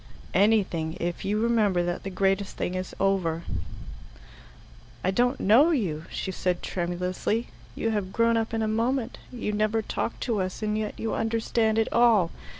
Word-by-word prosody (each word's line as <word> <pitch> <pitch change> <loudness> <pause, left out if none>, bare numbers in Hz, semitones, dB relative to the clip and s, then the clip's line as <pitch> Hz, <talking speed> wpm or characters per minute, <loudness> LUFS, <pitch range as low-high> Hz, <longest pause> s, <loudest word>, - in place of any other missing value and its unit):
"Anything 185 -5 +2
if 175 0 -3
you 210 +2 0
remember 215 -6 +2
that 175 0 -2
the 195 - -5
greatest 195 +1 0
thing 180 - -2
is 185 0 -4
over." 180 -4 +1 1.6
"I 185 - +2
don't 245 +6 +1
know 240 - +6
you," 180 - -1
she 190 - -4
said 180 -1 -1
tremulously. 180 +5 -2 0.3
"You 225 - -1
have 205 -3 -2
grown 230 +2 +3
up 225 0 0
in 225 -1 -1
a - - 0
moment. 235 +3 -1
You 230 -4 -3
never 215 +1 +1
talked 230 - -3
to 225 -5 0
us, 185 +3 -4
and 210 0 0
yet 215 -1 -3
you 225 - -2
understand 225 0 +1
it 225 - +3
all. 225 -8 +4
210 Hz, 165 wpm, -26 LUFS, 185-225 Hz, 1.6 s, know